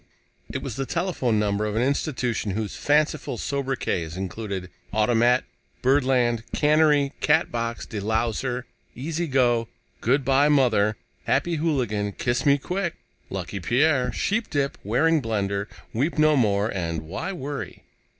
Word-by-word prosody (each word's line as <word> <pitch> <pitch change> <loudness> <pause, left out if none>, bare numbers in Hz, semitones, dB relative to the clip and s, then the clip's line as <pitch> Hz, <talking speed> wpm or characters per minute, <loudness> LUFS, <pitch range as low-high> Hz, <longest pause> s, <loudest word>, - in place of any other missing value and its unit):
It - - -4
was - - -5
the 135 -1 -2
telephone 170 - 0
number 105 0 +1
of 105 - -3
an 115 - +2
institution 125 -6 -1
whose 110 -2 -3
fanciful 150 +1 +1
sobriquets 130 - -2
included: 95 -1 -5 0.2
"Automat," 120 +3 +3 0.4
"Birdland," 125 -3 +3
"Cannery," 150 -2 +3
"Catbox," 120 -7 +1
"De 105 - -5
louser," 115 +4 -1 0.3
"Easy 160 +6 -3
go," 120 -4 +2 0.3
"Good 135 +4 +1
by, 140 +2 +4
Mother," 115 -7 +3 0.3
"Happy 170 -1 +1
Hooligan," 120 -10 0
"Kiss 120 +7 -1
me 140 0 +6
quick," 180 +4 -3 0.3
"Lucky 95 +1 -4
Pierre," 125 - +2
"Sheepdip," 145 - 0
"Waring 150 +9 +2
Blendor," 100 -3 -1 0.3
"Weep 140 +10 0
no 155 0 +5
more" 105 -5 +2
and 85 -4 -3
"Why 95 - -4
Worry?" 145 -5 -6
125 Hz, 130 wpm, -25 LUFS, 105-145 Hz, 0.4 s, me